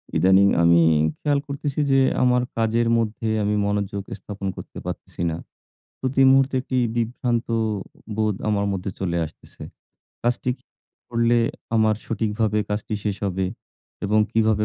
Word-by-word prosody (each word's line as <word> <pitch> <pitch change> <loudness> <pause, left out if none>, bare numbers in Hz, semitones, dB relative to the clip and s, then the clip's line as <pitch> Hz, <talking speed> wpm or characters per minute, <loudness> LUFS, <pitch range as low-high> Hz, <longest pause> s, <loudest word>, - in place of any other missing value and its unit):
ইদানীং 95 +2 +5 0.2
আমি 85 0 +6 0.4
খেয়াল 145 -1 +2
করতেছি 140 0 -3
যে, 135 - +5 0.2
আমার 125 0 +3
কাজের 115 +1 +2
মধ্যে 115 0 -1
আমি 105 +1 +1
মনোযোগ 100 -1 -1 0.2
স্থাপন 100 +1 -6
করতে - - -9
পারতেছি - - -6
না। 80 - -3 0.6
প্রতি 130 +1 +1
মুহূর্তে 135 0 +4
একটি 130 0 -3 0.2
বিভ্রান্ত 120 0 -1 0.7
বোধ 110 -2 +1
আমার 100 -1 +1
মধ্যে 95 0 -3
চলে 85 -3 -1
আসতেছে। 80 - -13 0.6
কাজটি 125 +1 0 0.5
করলে 115 0 +2 0.4
আমার 110 -1 +4
সঠিকভাবে 110 -1 0
কাজটি 105 +1 -2
শেষ 105 -2 -1
হবে 95 0 -1 0.6
এবং 105 +2 +2
কীভাবে 110 -1 +2
110 Hz, 130 wpm, -23 LUFS, 100-120 Hz, 0.7 s, আমি